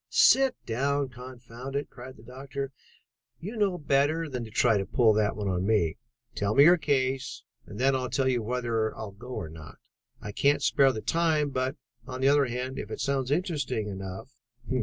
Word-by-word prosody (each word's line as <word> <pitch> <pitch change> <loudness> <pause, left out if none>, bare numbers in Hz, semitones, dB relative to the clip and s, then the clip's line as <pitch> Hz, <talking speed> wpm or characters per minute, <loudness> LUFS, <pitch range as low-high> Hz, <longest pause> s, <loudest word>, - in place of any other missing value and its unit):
"Sit 265 -1 +5
down, 140 +4 0
confound 125 +1 -9
you!" 140 - -1
cried 130 +1 -11
the 110 - -16
doctor. 135 +2 -6 0.7
"You 205 +8 -6
know 200 -4 +1
better 145 +2 +1
than 125 -3 -4
to 110 - -8
try 110 0 +3
to 95 - -2
pull 110 +1 +4
that 105 -1 +1
on 95 -3 -2
me. 100 -8 +2 0.4
Tell 105 +1 -1
me 140 - +8
your 175 +4 +7
case, 135 -4 -1 0.2
and 100 - -9
then 135 +3 +3
I'll 130 -1 -2
tell 130 +2 +1
you 125 -2 +1
whether 115 -1 -1
I'll 105 -2 -6
go 100 +5 -13
or - - -4
not. 80 -1 -11 0.4
I 105 - -7
can't 140 +6 +2
spare 135 -2 +4
the 110 - -5
time, 160 -2 +1
but, 130 +1 -1 0.3
on 130 -1 -6
the 135 +1 +4
other 145 0 +4
hand, 125 +2 -4
if - - -6
it - - -6
sounds 135 -2 -1
interesting 145 - -1
enough...." 95 +6 -7
130 Hz, 190 wpm, -28 LUFS, 110-140 Hz, 0.7 s, me